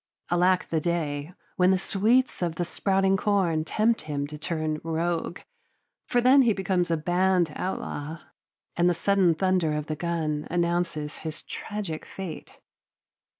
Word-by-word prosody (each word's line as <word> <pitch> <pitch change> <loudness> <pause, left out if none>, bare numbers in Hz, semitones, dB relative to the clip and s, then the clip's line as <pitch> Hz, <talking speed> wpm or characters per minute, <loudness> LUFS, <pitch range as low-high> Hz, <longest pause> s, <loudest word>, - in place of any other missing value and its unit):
Alack 180 +1 +3
the 160 -1 +1
day, 155 -2 -2 0.3
when 180 -1 +5
the 190 - +4
sweets 220 +7 +1
of 170 -2 -1
the 175 - -1
sprouting 195 +2 +1
corn 185 -6 +1
tempt 220 +7 +1
him 145 -2 -3
to 150 +1 -8
turn 155 0 -2
rogue, 165 +1 -2 0.7
for 245 - +2
then 255 +3 +6
he 235 -4 +4
becomes 185 -3 0
a 165 - +2
banned 175 0 +2
outlaw, 160 -4 -4 0.6
and 175 +1 +3
the 175 - +1
sudden 185 -1 +3
thunder 180 -2 +1
of 150 -1 -2
the 155 - -3
gun 155 -2 -2
announces 170 -3 -1
his 155 -1 -6
tragic 200 -7 -5
fate. 190 -4 -8
175 Hz, 150 wpm, -26 LUFS, 155-190 Hz, 0.7 s, then